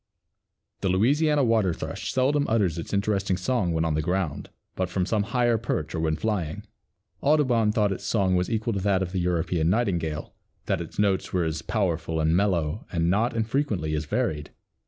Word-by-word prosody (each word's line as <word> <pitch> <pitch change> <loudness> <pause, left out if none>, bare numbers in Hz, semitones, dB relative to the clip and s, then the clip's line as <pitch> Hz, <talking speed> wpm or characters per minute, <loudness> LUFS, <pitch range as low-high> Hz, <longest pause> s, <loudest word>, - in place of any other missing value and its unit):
The 95 - -1
Louisiana 145 - +3
Water 110 -8 +2
thrush - - -5
seldom 140 +3 +2
utters 100 -7 +1
its 85 - -6
interesting 100 -2 0
song 95 -2 0
when 80 0 0
on 80 - 0
the 75 - 0
ground, 90 -2 -2 0.3
but 95 -1 -1
from 90 -1 0
some 105 +2 +1
higher 120 +1 +1
perch 80 -8 -3
or 85 - -2
when 80 -1 +1
flying. 100 -1 -2 0.6
Audubon 130 -7 +3
thought 105 -2 +1
its 95 - -4
song 95 -4 +1
was 90 0 0
equal 115 0 -1
to 100 - -1
that 95 -1 +1
of 90 - -5
the 95 - -1
European 85 -1 0
nightingale; 85 -8 -1 0.3
that - - 0
its 85 - -9
notes 100 -2 +1
were 90 -2 +2
as 80 -2 -2
powerful 80 +3 -1
and 80 +1 +2
mellow 90 -2 0
and 85 -1 +1
not 115 +5 +1
infrequently 110 - -1
as 75 0 -1
varied. 75 0 -1
95 Hz, 185 wpm, -26 LUFS, 85-110 Hz, 0.6 s, Louisiana